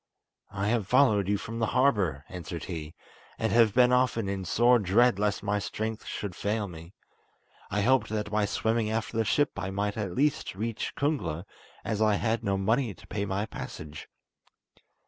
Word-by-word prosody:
"I 100 0 -2
have 110 -4 0
followed 110 -6 +4
you 100 - +2
from 115 +3 -6
the 115 - +1
harbour," 95 - +2
answered 85 -2 -6
he, 80 -3 -6 0.4
"and 110 - 0
have 115 -3 +4
been 125 0 +6
often 125 -4 +2
in 95 -1 -3
sore 120 +6 +4
dread 110 +3 +3
lest 105 -1 0
my 105 0 0
strength 110 +2 -4
should 100 -3 -4
fail 105 0 -1
me. 85 0 -11 0.8
I 105 +1 0
hoped 130 +5 +3
that 105 -1 -3
by 105 -1 +2
swimming 110 +1 0
after 110 +1 -2
the 115 - +2
ship 145 +8 +2
I 95 - -3
might 100 +2 -2
at 100 -5 -3
last 145 -7 +1
reach 110 +3 -3
Kungla, 125 - -1 0.4
as 110 -1 -1
I 105 -1 +4
had 115 +2 0
no 100 -1 0
money 110 +2 +1
to - - -16
pay 100 -1 -3
my 100 +2 -1
passage." 75 -7 -8
105 Hz, 180 wpm, -28 LUFS, 95-115 Hz, 0.8 s, been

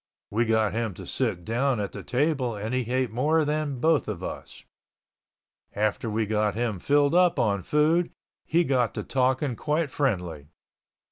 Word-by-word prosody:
We 115 +3 +1
got 110 -2 +2
him 110 -4 -2
to - - -9
sit 105 -10 -2
down 120 +2 0
at 100 -1 -3
the - - -7
table 130 -3 0
and 105 +4 -4
he 125 -2 -1
ate 130 -3 0
more 150 +7 +2
than 150 -3 -2
both 160 +2 +2
of 95 -4 -5
us. - - -7 1.1
After 105 +2 -1
we 110 +1 0
got 105 0 0
him 115 -4 -1
filled 145 - +2
up 180 -1 +4
on 100 -3 +1
food 155 - +2 0.3
he 170 +2 +2
got 125 -7 +1
to - - -3
talking 130 0 0
quite 150 +2 -1
friendly. 90 - -2
125 Hz, 165 wpm, -26 LUFS, 105-145 Hz, 1.1 s, up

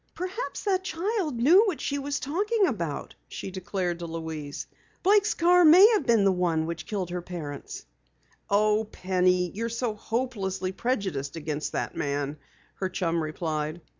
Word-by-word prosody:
"Perhaps 370 +7 -4
that 380 -2 +1
child 360 - -2
knew 325 - +6
what 365 -6 -1
she 285 0 -2
was 285 +1 -2
talking 405 - +1
about!" 170 - -3
she 190 - -6
declared 185 -2 -3
to 170 - -5
Louise. 160 -3 -5 0.4
"Blake's 415 +2 +4
car 355 +1 +5
may 350 +6 +9
have 420 - +1
been 230 -3 +4
the 195 - +5
one 170 -3 +1
which 165 -1 -5
killed 190 -5 -3
her 180 0 -3
parents!" 155 -6 -7 0.6
"Oh, 210 +2 +3
Penny, 180 -1 +1
you're 230 +3 -3
so 235 -1 -2
hopelessly 210 -5 -2
prejudiced 190 - -2
against 150 -2 -3
the - - -2
man," 145 +1 -2 0.4
her 190 - -2
chum 170 -3 -1
replied. 155 0 -3
195 Hz, 155 wpm, -27 LUFS, -, 0.6 s, may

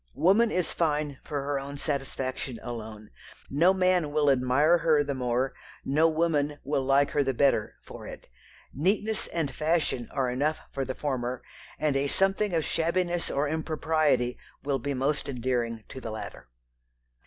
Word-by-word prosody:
Woman 210 +6 +4
is 180 -5 0
fine 150 -4 0
for 145 -3 -3
her 140 0 -1
own 140 +1 -7
satisfaction 135 -3 -3
alone. 110 -3 -7 0.4
No 165 +7 +5
man 185 -5 +2
will 145 -1 +3
admire 135 +6 +3
her 155 -2 +3
the 140 -1 -2
more, 125 0 0 0.3
no 155 +4 +4
woman 155 -3 +1
will 140 0 0
like 135 +1 +3
her 145 - +2
the 135 -1 -1
better, 135 -5 +2
for - - -10
it. - - -10 0.5
Neatness 205 - 0
and 155 -5 -2
fashion 155 -5 0
are 130 -2 0
enough 150 +5 0
for 135 - -2
the 130 0 -4
former, 130 -3 -3 0.3
and 150 -2 0
a 140 +1 +1
something 195 +3 +1
of 160 - +1
shabbiness 175 +1 0
or 140 +2 0
impropriety 155 -4 0 0.2
will 140 -1 0
be 145 -1 -2
most 140 +3 0
endearing 120 -3 -2
to 130 - -8
the 115 - -5
latter." 110 - -7
145 Hz, 160 wpm, -28 LUFS, 130-160 Hz, 0.5 s, No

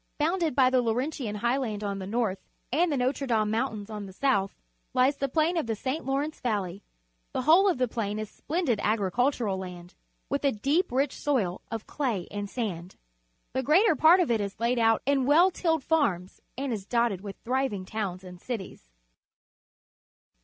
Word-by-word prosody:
Bounded 325 -1 0
by 260 -2 +5
the 255 -1 +4
Laurentian 245 -1 -2
Highland 235 -1 -1
on 200 -1 -2
the 190 - -6
north 215 -3 -1 0.3
and 335 +3 +3
the 285 - 0
Notre 260 +2 0
Dame 215 -3 +1
Moun 230 +4 +1 0.2
tains - - -23
on 210 -2 -5
the 190 - -11
south, 200 -5 +1 0.4
lies 260 +3 +3
the 275 - -1
plain 320 +5 +1
of 315 - -1
the 225 - -1
St. 260 +8 -3
Lawrence 280 +3 -2
Valley. 200 -5 -2 0.5
The - - -1
whole 345 +8 +6
of 355 - 0
the 255 0 +1
plain 215 -3 -3
is 215 0 -3
splendid 295 - -1
agricultural 215 0 +1
land, 180 -1 -8 0.3
with 280 +1 -2
a 280 - +3
deep. 285 - 0
rich 270 +3 +1
soil 215 -11 -1
of 225 -1 -5
clay 240 - -2
and 205 0 -4
sand. 185 -8 -4 0.6
The 260 - 0
greater 325 - +4
part 320 +6 +6
of 340 -9 +2
it 225 -2 +2
is 200 -1 -5
laid 235 +1 +1
out 225 -1 +3
in 270 -1 +2
well 340 +6 +6
tilled 325 -5 0
farms 195 - 0 0.2
and 270 -2 -2
is 200 -3 -5
dotted 235 -6 +1
with 200 -1 -7
thriving 250 -6 -1
towns 190 -3 -4
and 180 -1 -11
cities. 195 - -6
240 Hz, 185 wpm, -28 LUFS, 205-280 Hz, 0.6 s, whole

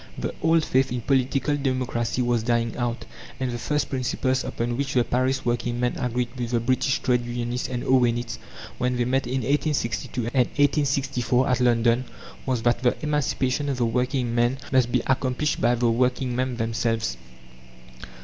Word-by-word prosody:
The - - -3
old 165 0 +3
faith 130 0 +2
in 125 -1 -2
Political 135 +3 +1
Democracy 130 -3 -1
was 120 -1 +1
dying 115 0 0
out, 120 -1 -2 0.3
and 130 -1 -1
the 120 - -4
first 150 +5 0
principles 130 0 -1
upon 120 +1 -2
which 135 +1 -2
the 125 - +4
Paris 130 +2 0
working 120 0 -1
men 125 0 +1
agreed 125 0 -1
with 120 -2 -3
the 120 -1 +1
British 130 +3 +1
trade 125 -2 +2
unionists 120 +1 -3
and 125 -1 -3
Owenites, 120 -2 +1 0.4
when 125 0 0
they 120 - +1
met 130 +2 0
in 130 +1 -1
1862 140 -3 -1
and 125 -3 +3
1864, 135 -3 +1
at 125 - +2
London, 120 0 +3 0.4
was 125 -3 0
that 120 0 +2
"the 125 -1 +2
emancipation 145 -2 0
of 135 - -1
the 120 - +1
working 125 +1 0
men 120 +2 +2
must 130 -3 +3
be 125 -1 +1
accomplished 130 +2 0
by 120 +2 +3
the 120 -1 +2
working 125 +1 0
men 130 -1 -1
themselves." 115 0 -1
125 Hz, 170 wpm, -25 LUFS, 120-130 Hz, 0.4 s, the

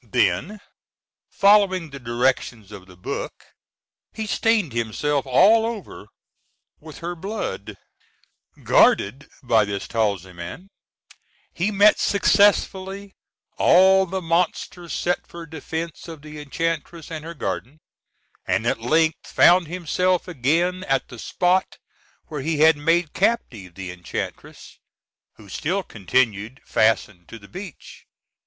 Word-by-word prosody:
Then, 210 0 0 0.7
following 195 -5 +3
the 140 - -8
directions 120 -3 -1
of 95 -3 -11
the 90 -1 -16
book, 90 - -6 0.7
he 220 - -5
stained 210 - +1
himself 135 +5 -1
all 215 - +5
over 225 -3 -6 0.7
with 155 0 -12
her 175 - -2
blood. 195 - -5 0.9
Guarded 130 +9 +3
by 115 -4 +3
this 100 -1 -4
talisman, 100 - -3 0.8
he 180 +5 0
met 210 +1 +5
successively 200 -1 +2 0.5
all 190 +1 +5
the 190 +1 -4
monsters 170 +1 -1
set 180 0 -1
for 170 -1 -9
defence 160 +1 -6
of 160 -3 -10
the 150 0 -9
enchantress 165 +2 -4
and 155 -2 -6
her 170 +1 -8
garden, 140 -1 -4 0.7
and - - 0
at - - 0
length 160 +6 +1
found 175 -1 +5
himself 180 +2 0
again 175 +5 0
at 135 -4 0
the 125 - -10
spot 180 - 0 0.5
where 150 -3 -6
he 155 +1 -1
had 160 0 +7
made 165 +2 +1
captive 110 - -1
the 95 -2 -6
enchantress, 90 -1 -7 0.5
who 105 - -17
still 180 - -2
continued 110 - -1
fastened 105 -5 +1
to 115 - -10
the 100 -2 -15
beech. 185 - -11
160 Hz, 120 wpm, -22 LUFS, 120-185 Hz, 0.9 s, had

